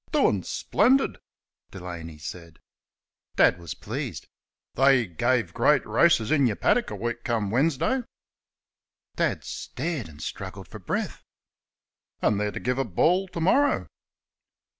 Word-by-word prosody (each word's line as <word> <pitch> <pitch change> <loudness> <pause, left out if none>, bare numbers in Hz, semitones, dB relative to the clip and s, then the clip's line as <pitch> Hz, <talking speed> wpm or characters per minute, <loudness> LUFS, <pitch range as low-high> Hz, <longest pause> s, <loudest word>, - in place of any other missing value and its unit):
"Doin' - - +3
splendid," 270 +2 +2 0.5
Delaney 85 -4 -8
said. 85 0 -9 0.8
Dad 85 - +4
was 85 -2 -7
pleased. - - -5 0.5
"They 135 -2 +4
guve 115 +2 0
great - - +3
raices 110 +4 +3
in 140 -4 +4
yur 105 - -1
paddick 240 - +2
a - - -5
week 120 0 -4
come 110 -4 -1
Winsdy." 165 - +1 1.1
Dad - - 0
stared 155 - -4
and 75 -1 -14
struggled 95 +1 -7
for 105 +3 -10
breath. 90 - -3 1.0
"An' 105 - +2
they're 105 0 0
to - - -5
guve 125 +1 -1
a - - +2
ball 175 - +2
to 180 -2 -6
morrer." 275 - +2
120 Hz, 130 wpm, -26 LUFS, -, 1.1 s, Dad